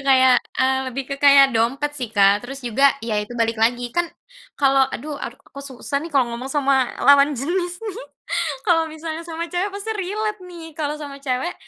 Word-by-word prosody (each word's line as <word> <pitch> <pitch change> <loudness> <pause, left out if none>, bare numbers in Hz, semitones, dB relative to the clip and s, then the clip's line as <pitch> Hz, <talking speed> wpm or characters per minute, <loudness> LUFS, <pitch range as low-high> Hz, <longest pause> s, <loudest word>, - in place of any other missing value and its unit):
kayak 260 -1 +6 0.3
eee, 265 0 +3
lebih 260 +1 -4
ke 275 - -3
kayak 275 -1 +8
dompet 275 +6 0
sih 245 -4 -4
Kak 200 +1 +4
terus 270 +2 -7
juga 260 +3 +3
ya 225 -2 -2
itu 225 - -11
balik 230 0 +1
lagi 240 +2 +1
kan 345 - +3 0.6
kalau 270 -1 +4
aduh 290 +4 -5
aku 275 +2 -9
susah 275 +1 -5
nih 335 - -9
kalau 260 -4 +3
ngomong 260 +3 -6
sama 270 -3 +2
lawan 280 +2 +6
jenis 350 - -3
nih 425 -3 -6 0.7
kalau 325 -2 +2
misalnya 315 +1 -6
sama 335 0 -5
cewek 360 +4 -2
pasti 405 +3 -5
relate 420 +1 -3
nih 325 -3 -10
kalau 300 -1 -3
sama 280 -2 -9
cewek, 265 +5 -2
280 Hz, 185 wpm, -21 LUFS, 255-330 Hz, 0.7 s, kayak